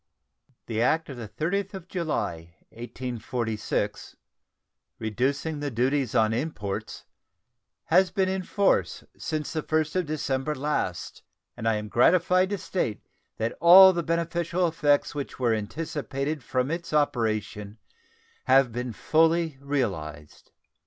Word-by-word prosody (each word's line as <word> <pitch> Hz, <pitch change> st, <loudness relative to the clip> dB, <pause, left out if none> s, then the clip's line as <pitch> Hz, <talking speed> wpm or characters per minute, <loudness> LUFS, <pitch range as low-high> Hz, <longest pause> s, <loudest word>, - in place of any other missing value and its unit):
The 115 Hz, -1 st, -2 dB
act 160 Hz, +7 st, +1 dB
of 135 Hz, -, -7 dB
the 115 Hz, -2 st, -6 dB
30th 195 Hz, -, -2 dB
of 185 Hz, -2 st, -9 dB
July, 85 Hz, -, -3 dB
1846, 120 Hz, -2 st, -4 dB, 0.8 s
"reducing 135 Hz, +8 st, -1 dB
the 145 Hz, 0 st, -2 dB
duties 130 Hz, +1 st, 0 dB
on 110 Hz, 0 st, +3 dB
imports," 115 Hz, -7 st, -4 dB, 0.8 s
has 185 Hz, +3 st, +4 dB
been 190 Hz, -2 st, 0 dB
in 190 Hz, 0 st, -1 dB
force 200 Hz, +2 st, +1 dB
since 155 Hz, -2 st, -4 dB
the 155 Hz, -, -1 dB
1st 155 Hz, +1 st, -1 dB
of 180 Hz, -, +1 dB
December 145 Hz, -1 st, -2 dB
last, 135 Hz, -, -3 dB, 0.3 s
and 115 Hz, -, -4 dB
I 115 Hz, -, +3 dB
am 105 Hz, 0 st, -4 dB
gratified 180 Hz, -, +3 dB
to 205 Hz, -, -1 dB
state 150 Hz, -, -3 dB, 0.3 s
that 115 Hz, +1 st, -2 dB
all 190 Hz, +2 st, +9 dB
the 170 Hz, -, -1 dB
beneficial 170 Hz, +1 st, 0 dB
effects 150 Hz, -3 st, +1 dB
which 145 Hz, -2 st, -5 dB
were 120 Hz, -3 st, +2 dB
anticipated 140 Hz, +5 st, -3 dB
from 130 Hz, +2 st, -1 dB
its 170 Hz, -1 st, -4 dB
operation 110 Hz, -7 st, -1 dB, 0.7 s
have 130 Hz, -1 st, +4 dB
been 120 Hz, +1 st, -4 dB
fully 160 Hz, +1 st, +2 dB
realized. 95 Hz, -, -4 dB
145 Hz, 125 wpm, -26 LUFS, 115-165 Hz, 0.8 s, all